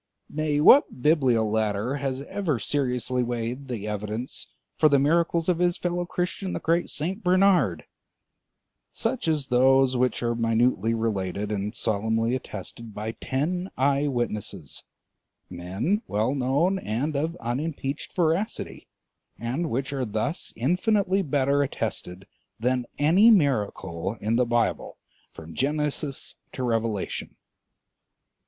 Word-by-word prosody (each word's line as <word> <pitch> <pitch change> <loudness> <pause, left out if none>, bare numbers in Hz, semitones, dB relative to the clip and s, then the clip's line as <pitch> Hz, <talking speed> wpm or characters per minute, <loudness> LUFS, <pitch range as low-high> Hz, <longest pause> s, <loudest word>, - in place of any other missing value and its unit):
Nay, 150 -1 0
what 150 - +6
Bibliolater 115 -4 +2
has 135 -1 -2
ever 185 -4 -1
seriously 125 -1 0
weighed 120 +2 -3
the 110 -5 -4
evidence 105 +4 -4 0.3
for 155 - +4
the 140 - +5
miracles 165 +3 +2
of 180 -2 +2
his 175 -1 +2
fellow 175 0 -2
Christian 180 +2 -2
the - - -2
great 170 +2 +1
St. 185 +8 -3
Bernard; 180 - +3 1.1
such 235 -4 -2
as 150 -4 0
those 130 +1 +4
which 125 -1 +1
are 120 0 +1
minutely 115 -1 +2
related 105 -2 -2
and 105 +1 -3
solemnly 110 +2 0
attested 115 -3 -6
by 110 +2 -3
ten 170 +11 -2
eye 140 +2 +2
witnesses, 120 -6 -3 0.7
men 95 - -1
well 110 +6 0
known 145 +8 +1
and 140 - -2
of 160 +4 -1
unimpeached 140 +2 -3
veracity, 175 +5 -1 0.5
and 130 +9 -2
which 130 +4 -2
are 135 -2 -1
thus 110 - -2
infinitely 190 - +2
better 140 -3 +1
attested 95 -8 -3 0.3
than 125 +1 0
any 175 +10 +6
miracle 105 - +1
in 110 +2 0
the 125 +1 +3
Bible 120 -1 0 0.3
from 80 +1 -11
Genesis 145 - -1 0.2
to 130 - -4
Revelation? 115 -4 -2
130 Hz, 120 wpm, -26 LUFS, 115-160 Hz, 1.1 s, what